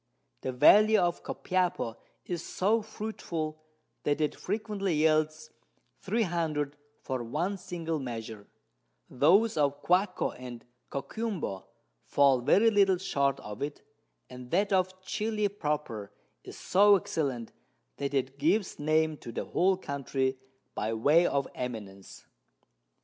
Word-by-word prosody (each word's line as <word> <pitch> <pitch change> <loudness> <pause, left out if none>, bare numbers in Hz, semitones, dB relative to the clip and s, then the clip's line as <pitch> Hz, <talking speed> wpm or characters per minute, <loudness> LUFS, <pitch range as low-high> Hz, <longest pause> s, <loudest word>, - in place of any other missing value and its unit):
The - - -2
Valley 210 +12 +6
of 175 -3 +1
Copiapo 180 -11 -1 0.3
is 175 -2 -4
so 215 +5 +1
fruitful, 170 -8 -5 0.4
that 145 0 0
it 150 -1 +1
frequently 200 -3 -2
yields 155 0 +1 0.5
300 170 -8 -1 0.3
for 130 -3 -3
one 160 - -2
single 165 -4 -4
Measure, 115 -5 -6 0.6
those 185 - +4
of 145 -1 +1
Guasco 185 +2 +2
and 125 -2 -9 0.2
Coquimbo 145 - -4 0.4
fall 140 -3 +3
very 215 - +4
little 195 -3 +4
short 140 -7 0
of 105 0 -8
it, 145 +1 -4 0.4
and 125 -1 -10
that 200 +5 +1
of 185 0 0
Chili 210 +1 -1
proper 150 - -3 0.3
is - - -10
so 205 +2 +5
excellent, 135 - -2 0.5
that 140 0 -3
it 135 +1 -1
gives 205 -3 +1
Name 155 +1 +2
to 120 - -9
the - - -4
whole 185 +1 +2
Country 135 -4 -2 0.4
by 110 +1 -2
way 150 +10 +4
of 140 -1 0
Eminence. 105 -6 -7
155 Hz, 120 wpm, -29 LUFS, 135-190 Hz, 0.6 s, Valley